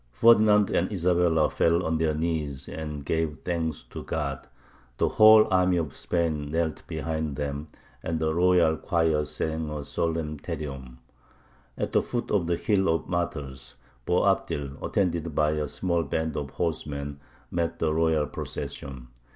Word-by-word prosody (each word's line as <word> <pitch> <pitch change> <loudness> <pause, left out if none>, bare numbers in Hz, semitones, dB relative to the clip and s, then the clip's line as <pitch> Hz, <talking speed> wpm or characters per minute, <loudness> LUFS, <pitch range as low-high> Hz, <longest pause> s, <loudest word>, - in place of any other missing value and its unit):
Ferdinand 105 - +5
and 90 - +1
Isabella 85 -4 +2
fell 85 +2 +2
on 80 0 0
their 80 -1 +1
knees 75 -4 -2
and 75 -3 -6
gave 80 -1 -1
thanks 80 -3 -2
to - - -6
God; 70 -4 -4 0.5
the - - +2
whole 110 0 +7
army 90 -1 +3
of 80 -5 -3
Spain 80 -4 -1
knelt 80 0 -1
behind 80 -1 -3
them, 70 +1 -4 0.3
and 80 0 -2
the 80 0 0
royal 85 -2 +4
choir 80 -3 +1
sang 80 +1 -3
a 75 -1 -4
solemn 75 +1 -2
Te 85 +3 -4
Deum. 70 -5 -7 0.8
At - - -2
the - - +3
foot 120 -1 -4
of 95 -5 +1
the 85 -1 +1
Hill 95 -2 +1
of 80 0 0
Martyrs, 70 -8 -4 0.3
Boabdil, 70 -1 0
attended 85 -5 -1
by 75 0 +3
a 75 -1 -1
small 85 +3 -1
band 80 -1 -2
of 70 -2 -3
horsemen, 70 -3 -3 0.3
met 85 -1 -1
the 80 -1 0
royal 80 -2 +2
procession. 65 -2 -6
80 Hz, 150 wpm, -27 LUFS, 75-85 Hz, 0.8 s, whole